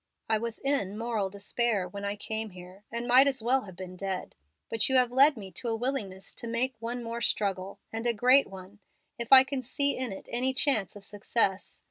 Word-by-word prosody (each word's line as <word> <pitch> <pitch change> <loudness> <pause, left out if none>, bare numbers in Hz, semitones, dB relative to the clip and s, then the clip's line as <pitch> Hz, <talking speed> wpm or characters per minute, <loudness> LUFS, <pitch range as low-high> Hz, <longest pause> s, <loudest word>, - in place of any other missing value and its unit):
I 220 -1 +1
was 230 0 -4
in 270 -8 -1
moral 225 -4 -2
despair 200 0 -1
when 200 +2 -7
I 200 0 -2
came 220 +1 -5
here, 185 +1 -13
and 235 +1 -4
might 255 +3 +6
as 265 -4 0
well 255 +1 +1
have 190 -3 -11
been 185 0 -8
dead, 190 0 -5 0.3
but 225 +2 0
you 265 - +1
have 250 -2 +4
led 275 +2 +5
me 195 -3 -9
to 235 - -4
a 225 - 0
willingness 220 -6 -3
to 235 - -6
make 240 +3 0
one 235 +2 -4
more 230 0 -5
struggle, 195 -3 -1 0.2
and 225 +2 -2
a - - +4
great 255 +5 +5
one, 190 +2 -12 0.4
if 235 - -5
I 265 -1 +11
can 270 0 -4
see 280 +3 +1
in 255 -3 -2
it 195 - -9
any 255 +2 0
chance 240 -10 +2
of 200 -1 -10
success. 205 -1 -1
225 Hz, 215 wpm, -28 LUFS, 200-250 Hz, 0.4 s, I